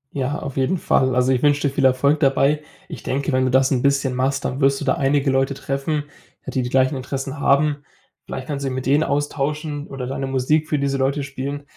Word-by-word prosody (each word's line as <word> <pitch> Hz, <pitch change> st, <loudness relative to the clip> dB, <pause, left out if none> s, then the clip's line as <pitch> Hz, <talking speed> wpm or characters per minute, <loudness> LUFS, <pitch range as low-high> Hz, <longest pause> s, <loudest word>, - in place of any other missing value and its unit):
Ja, 140 Hz, +2 st, -1 dB
auf 140 Hz, -1 st, -7 dB
jeden 135 Hz, +8 st, +1 dB
Fall. 130 Hz, -5 st, +1 dB
Also, 125 Hz, +1 st, +3 dB
ich 125 Hz, -, +1 dB
wünsche 145 Hz, -1 st, +3 dB
dir 140 Hz, -, -3 dB
viel 135 Hz, -2 st, +1 dB
Erfolg 140 Hz, +4 st, +3 dB
dabei. 140 Hz, +1 st, +2 dB, 0.3 s
Ich -, -, -8 dB
denke, 140 Hz, +2 st, -2 dB
wenn 130 Hz, 0 st, +2 dB
du -, -, +1 dB
das 130 Hz, +1 st, +3 dB
'n 125 Hz, -2 st, +1 dB
bisschen 140 Hz, -1 st, +1 dB
machst, 130 Hz, +2 st, -1 dB
dann 135 Hz, +3 st, -3 dB
wirst 135 Hz, 0 st, +3 dB
du 145 Hz, -, -5 dB
da 130 Hz, -, +3 dB
einige 140 Hz, -2 st, +1 dB
Leute 135 Hz, +1 st, +1 dB
treffen, 140 Hz, +3 st, -2 dB, 0.4 s
ja, -, -, -5 dB
die 130 Hz, -, 0 dB
die 125 Hz, -, -3 dB
gleichen 130 Hz, +2 st, +2 dB
Interessen 135 Hz, +2 st, -5 dB
haben. 145 Hz, +1 st, +3 dB, 0.5 s
Vielleicht 130 Hz, -, -6 dB
kannst 140 Hz, 0 st, -4 dB
du 135 Hz, -, -1 dB
dich 130 Hz, -, -4 dB
mit 130 Hz, -, -4 dB
denen 145 Hz, +3 st, +3 dB
austauschen 145 Hz, +1 st, -2 dB
oder 135 Hz, -2 st, -6 dB
deine 135 Hz, +1 st, -3 dB
Musik 135 Hz, +4 st, +1 dB
für 150 Hz, -, +1 dB
diese 140 Hz, -1 st, 0 dB
Leute 135 Hz, +2 st, 0 dB
spielen. 135 Hz, +1 st, -5 dB
135 Hz, 235 wpm, -21 LUFS, 130-145 Hz, 0.5 s, Also